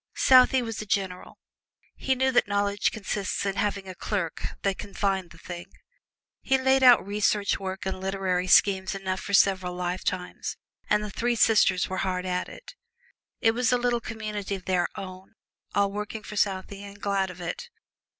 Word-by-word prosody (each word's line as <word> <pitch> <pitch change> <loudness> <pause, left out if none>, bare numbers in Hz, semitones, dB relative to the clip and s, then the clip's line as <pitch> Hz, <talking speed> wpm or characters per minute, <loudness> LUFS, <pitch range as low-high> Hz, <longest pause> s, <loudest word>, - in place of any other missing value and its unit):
Southey 255 0 +6
was 225 -2 -4
a - - -6
general: 190 -2 -2 0.6
he 265 - 0
knew 265 +1 +2
that 245 - +3
knowledge 205 0 +1
consists 200 -2 -3
in 195 -1 -1
having 200 -2 -1
a 185 - -6
clerk 185 -2 -3 0.2
who 195 - +2
can 200 +1 -10
find 190 -3 0
the 170 - -15
thing. 175 +1 -8 0.7
He 265 - +2
laid 265 0 +3
out 250 -5 +7
research 205 0 +1
work 190 -1 -5
and 190 -1 -3
literary 190 -1 -1
schemes 190 0 +4
enough 190 -1 -3
for 200 - 0
several 185 -2 +3
lifetimes, 180 0 -3 0.3
and 210 0 +3
the 210 - -5
three 240 +4 0
sisters 205 -5 +4
were 185 - -4
hard 185 -1 -1
at 180 0 -2
it. - - -12 0.7
It 225 - +5
was 240 +1 +1
a 250 - +4
little 240 -1 0
community 210 -3 -4
of 185 - -10
their 180 -2 +1
own 185 +2 -9 0.4
all 200 -1 +2
working 210 +1 -5
for 210 - -8
Southey, 195 0 -1
and 200 0 -11
glad 195 -2 0
of 180 -1 -10
it. 175 - -5
200 Hz, 180 wpm, -26 LUFS, 185-215 Hz, 0.7 s, out